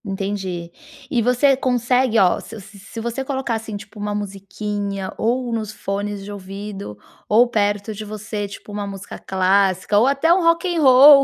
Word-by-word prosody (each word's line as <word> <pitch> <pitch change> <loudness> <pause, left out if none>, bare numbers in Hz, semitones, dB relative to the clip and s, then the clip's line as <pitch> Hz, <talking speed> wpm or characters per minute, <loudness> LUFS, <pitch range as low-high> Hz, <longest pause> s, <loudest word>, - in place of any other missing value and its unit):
Entendi. 195 -4 -4 0.4
E 245 -5 +2
você 250 +4 +4
consegue, 250 -1 +1
ó, 185 -4 +4
se 225 - -9
se 200 +1 -14
se 215 +4 -9
você 235 +3 -3
colocar, 265 -3 -2
assim, 220 -2 -4
tipo, 210 +1 -12
uma 205 0 -2
musiquinha, 200 0 -4
ou 240 +1 0
nos 215 -2 -2
fones 205 -1 -4
de 205 - -8
ouvido, 195 - -7 0.3
ou 230 +4 +6
perto 205 -1 0
de 215 +1 -7
você, 210 0 -5
tipo, 200 +1 -11
uma 205 0 -4
música 195 0 -8
clássica 190 +1 +2
ou 235 - +4
até 280 +5 +4
um 370 - +2
Rock 335 +1 +3
and 325 - +1
Roll, 275 +1 +9
210 Hz, 175 wpm, -21 LUFS, 200-245 Hz, 0.4 s, Roll